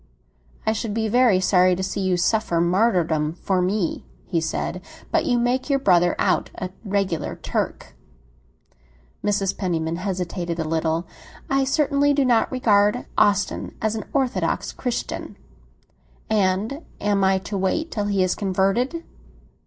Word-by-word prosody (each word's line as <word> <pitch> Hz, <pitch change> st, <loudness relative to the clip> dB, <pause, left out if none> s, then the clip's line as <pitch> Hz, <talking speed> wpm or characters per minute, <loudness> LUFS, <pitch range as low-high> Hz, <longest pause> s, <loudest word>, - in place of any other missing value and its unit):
"I 220 Hz, -, +2 dB
should 220 Hz, -1 st, -3 dB
be 220 Hz, -1 st, 0 dB
very 235 Hz, -3 st, +4 dB
sorry 185 Hz, -1 st, +4 dB
to 190 Hz, -, -3 dB
see 190 Hz, +1 st, -2 dB
you 185 Hz, -1 st, +1 dB
suffer 175 Hz, -1 st, +1 dB
martyrdom 170 Hz, -4 st, +2 dB
for 185 Hz, +1 st, -1 dB
me," 185 Hz, -1 st, -1 dB, 0.2 s
he 170 Hz, -3 st, -1 dB
said. 180 Hz, +2 st, -3 dB, 0.3 s
"But 330 Hz, -1 st, +2 dB
you 245 Hz, -3 st, +3 dB
make 245 Hz, +3 st, 0 dB
your 275 Hz, -, +3 dB
brother 175 Hz, -8 st, +3 dB
out 185 Hz, -, +1 dB
a 185 Hz, -, -5 dB
regular 195 Hz, -6 st, -1 dB
Turk." -, -, -4 dB, 1.3 s
Mrs. 200 Hz, -2 st, 0 dB
Penniman 165 Hz, -3 st, -2 dB
hesitated 180 Hz, -2 st, -3 dB
a 165 Hz, -, -1 dB
little. 160 Hz, +1 st, -1 dB, 0.5 s
"I 275 Hz, 0 st, +3 dB
certainly 285 Hz, 0 st, +2 dB
do 280 Hz, -1 st, +2 dB
not 240 Hz, -3 st, +3 dB
regard 210 Hz, -2 st, +2 dB
Austin 205 Hz, -1 st, +1 dB
as 220 Hz, 0 st, 0 dB
a -, -, -2 dB
satisfactory 265 Hz, -3 st, -1 dB
Christian." 245 Hz, -2 st, -4 dB, 0.9 s
"And 210 Hz, -, +1 dB, 0.2 s
am 205 Hz, -1 st, +1 dB
I 190 Hz, 0 st, +4 dB
to 195 Hz, +2 st, -6 dB
wait 195 Hz, -, -1 dB
till 210 Hz, -2 st, -2 dB
he 200 Hz, -2 st, +1 dB
is 185 Hz, -, +1 dB
converted?" 200 Hz, -, 0 dB
200 Hz, 145 wpm, -23 LUFS, 180-235 Hz, 1.3 s, very